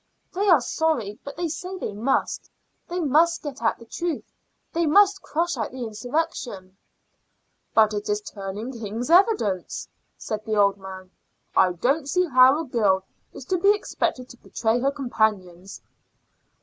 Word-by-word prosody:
"They 395 +2 +1
are 325 -7 +6
sorry, 240 -7 -1
but 280 - -8
they 345 0 -1
say 365 +4 -5
they 215 - -4
must. 230 +7 -1 0.4
They 355 +1 -3
must 330 +2 +3
get 285 -5 -6
at 225 - +1
the 230 - -14
truth; 335 +7 -4 0.4
they 335 0 +1
must 400 +4 +5
crush 335 -1 -1
out 220 - -2
the 255 0 -6
insurrection." 225 - -4 1.0
"But 215 -1 +5
it 205 0 -4
is 210 0 +1
turning 205 +4 -6
king's 230 +3 -5
evidence," 350 - +2 0.3
said 215 -1 -5
the 220 -1 -2
old 200 -1 +3
man. 190 -1 -10 0.4
"I 180 - +4
don't 275 - 0
see 365 +5 +2
how 260 -1 +6
a 325 - -3
girl 205 -7 +1 0.3
is 260 - -10
to 365 +5 0
be 400 +3 +5
expected 255 -10 -3
to 245 - -12
betray 230 0 -1
her 270 +3 +2
companions." 210 -9 -2
245 Hz, 160 wpm, -24 LUFS, 210-325 Hz, 1.0 s, are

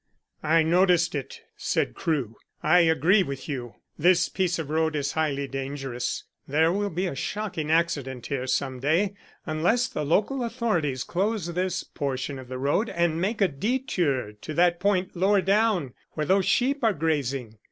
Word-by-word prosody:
"I 160 +1 +3
noticed 175 0 +3
it," 140 -4 -5
said - - -1
Crewe. 135 - -2 0.3
"I 165 +4 +5
agree 170 +4 +4
with 140 -6 -4
you: 125 -6 -5 0.2
this 175 +2 +4
piece 180 -3 0
of 155 -3 -5
road 160 0 +1
is 140 -1 -1
highly 140 -3 -1
dangerous. 135 -2 -4 0.2
There 160 +4 +3
will 205 +2 0
be 180 +2 -2
a 175 - -2
shocking 170 +1 -3
accident 145 -7 0
here 130 -2 -3
some 130 0 -1
day 165 +9 +1 0.3
unless 180 +11 +1
the 150 - -4
local 215 - +1
authorities 180 - -1
close 190 -2 -1
this 185 0 -1
portion 135 -2 -4
of 130 - -10
the 130 +1 -5
road 145 - +1
and 170 -1 0
make 210 +4 -1
a 195 - +6
detour 175 - -1
to 105 +9 -8
that 175 +1 +3
point 190 -1 0
lower 195 +3 +3
down 195 - +2 0.2
where 155 - -2
those 190 +4 +2
sheep 275 +2 +2
are 225 -2 +4
grazing. 140 - -2
160 Hz, 165 wpm, -26 LUFS, 140-190 Hz, 0.3 s, a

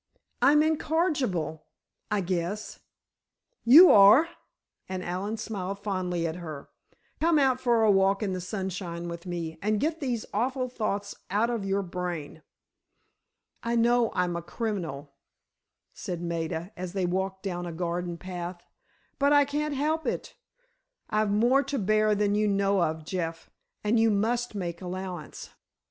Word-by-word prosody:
"I'm 300 +2 +6
incorrigible, 290 - 0 0.4
I 210 -1 +1
guess——" 185 +3 -3 0.8
"You 315 +10 +9
are!" 210 +11 +7 0.6
and 185 -1 -4
Allen 195 +5 -3
smiled 200 -3 -4
fondly 185 -4 -2
at 165 +1 -3
her. 155 -5 -8 0.5
"Come 330 0 +3
out 260 -3 +3
for 235 -3 +3
a 215 - +5
walk 195 +1 +3
in 195 -2 -1
the 185 - -3
sunshine 180 -3 -4
with 170 +1 -7
me, 165 -2 -4
and 210 +1 +1
get 320 +5 -1
these 245 -6 -2
awful 255 +4 -1
thoughts 205 -4 -3 0.2
out 215 +5 +1
of 230 -4 -2
your 195 +1 0
brain." 175 -4 -5 1.2
"I 235 0 -1
know 235 0 +3
I'm 180 -1 0
a 170 - -3
criminal," 170 - -4 0.8
said 175 -2 -5
Maida, 170 +1 -3
as 180 0 -6
they 190 -2 0
walked 190 +2 -2
down 175 -3 -3
a - - -4
garden 175 +1 -3
path; 175 -1 -6 0.6
"but 280 +1 +3
I 290 -1 +6
can't 295 +1 -2
help 310 +3 0
it. - - -3 0.8
I've 215 0 +2
more 240 +7 +4
to 280 - -2
bear 215 0 +2
than 205 0 +1
you 210 +1 +2
know 200 -1 +2
of, 160 -1 -1
Jeff, 165 -1 -4 0.3
and 220 +2 +2
you 225 0 +4
must 225 +3 0
make 175 -3 -4
allowance." 180 -3 -6
195 Hz, 150 wpm, -27 LUFS, 175-230 Hz, 1.2 s, You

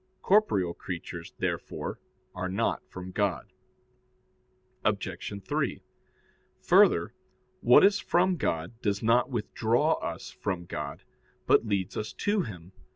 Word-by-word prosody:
Corporeal 105 - +3
creatures, 85 -2 -7
therefore, - - -3 0.3
are 95 0 -3
not 95 - 0
from 90 0 -8
God. 100 -2 -1 1.3
Obj. - - -1 0.2
3: - - -1 0.8
Further, - - +4 0.5
what 125 +9 +7
is 200 0 +4
from 180 +1 +2
God 85 - -2
does 100 -1 -1
not 115 +2 +3
withdraw 120 +5 +1
us - - -5
from 90 -3 -3
God, 75 -3 -6 0.4
but 115 - +4
leads 100 -2 -1
us 110 +1 -4
to 205 0 +1
Him. 90 - -8
105 Hz, 115 wpm, -28 LUFS, 90-125 Hz, 1.3 s, what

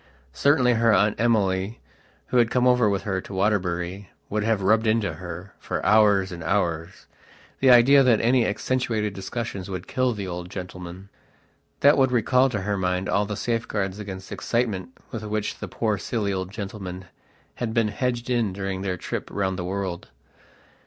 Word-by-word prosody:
Certainly 130 -4 +3
her 115 -1 +5
Aunt 105 0 +3
Emily, 105 -3 +1 0.5
who 125 - +1
had 120 -2 +4
come 125 0 +2
over 125 -3 +4
with 100 -1 -1
her 95 -2 -2
to 95 - -9
Waterbury, 95 -1 -1 0.2
would 105 +1 0
have 110 -3 +1
rubbed 110 +3 +3
into 110 -5 +1
her, 90 +3 -8
for - - -4
hours 105 -3 +4
and 85 -2 -7
hours, 85 -2 -1 0.5
the 135 - +4
idea 125 +3 +7
that 125 -4 +4
any 120 +1 +3
accentuated 110 -1 -1
discussions 100 -1 -5
would 90 -1 -5
kill 130 -1 0
the 100 -2 -4
old 90 -1 -6
gentleman. 90 0 -8 0.7
That 145 0 +6
would 130 -2 +4
recall 125 +2 +3
to 105 -5 -3
her 100 +1 -1
mind 90 0 -1
all 100 0 +1
the 105 -1 -4
safeguards 105 -4 -2
against 95 -2 -8
excitement 115 -4 -1 0.2
with 115 -3 -5
which 105 0 -3
the - - -5
poor 110 -3 -1
silly 105 -1 -2
old 95 -1 -3
gentleman 95 -3 -6 0.5
had 120 -2 -2
been 110 -1 +2
hedged 120 +2 -2
in 120 -6 0
during 95 0 -4
their 95 -2 -2
trip - - -5
round 95 -2 -2
the - - -2
world. 95 -1 -4
105 Hz, 175 wpm, -24 LUFS, 95-115 Hz, 0.7 s, idea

